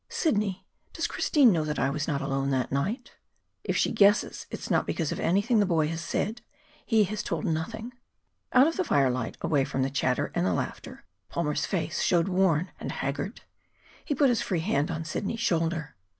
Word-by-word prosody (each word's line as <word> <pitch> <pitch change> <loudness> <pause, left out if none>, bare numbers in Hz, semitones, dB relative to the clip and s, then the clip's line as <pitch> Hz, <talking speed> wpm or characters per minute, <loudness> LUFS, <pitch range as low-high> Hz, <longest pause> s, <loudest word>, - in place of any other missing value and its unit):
"Sidney, 215 - 0 0.3
does - - -2
Christine 275 -7 +4
know 165 -4 +1
that 150 -1 -3
I 135 - +1
was 145 +1 -2
not 140 -4 -1
alone 135 0 -1
that 130 -2 0
night?" 170 - -2 0.5
"If - - -1
she - - +2
guesses, 205 0 +3
it - - -5
is - - -6
not - - +2
because 160 -4 -1
of - - -3
anything 205 +7 +2
the 205 - +4
boy 160 -4 +2
has 165 0 -4
said. 215 +6 -2 0.4
He 220 -3 +3
has 210 +2 -3
told 165 -3 -3
nothing." 220 +9 -3 0.6
Out 255 +2 +6
of 330 - 0
the 375 - +2
firelight, 130 - +1
away 145 -4 +2
from 130 0 -1
the 135 - -1
chatter 130 -2 0
and - - 0
the 90 0 +1
laughter, - - -5 0.2
Palmer's 150 -3 -1
face 185 -4 -2
showed 175 +1 +2
worn 180 -2 +2
and - - -4
haggard. 145 - -4 0.6
He 290 - -2
put 275 0 +4
his 240 -3 +1
free 175 -4 -1
hand 155 -5 0
on 160 0 -3
Sidney's 200 +8 -3
shoulder. 165 -6 0
170 Hz, 195 wpm, -27 LUFS, 145-215 Hz, 0.6 s, Out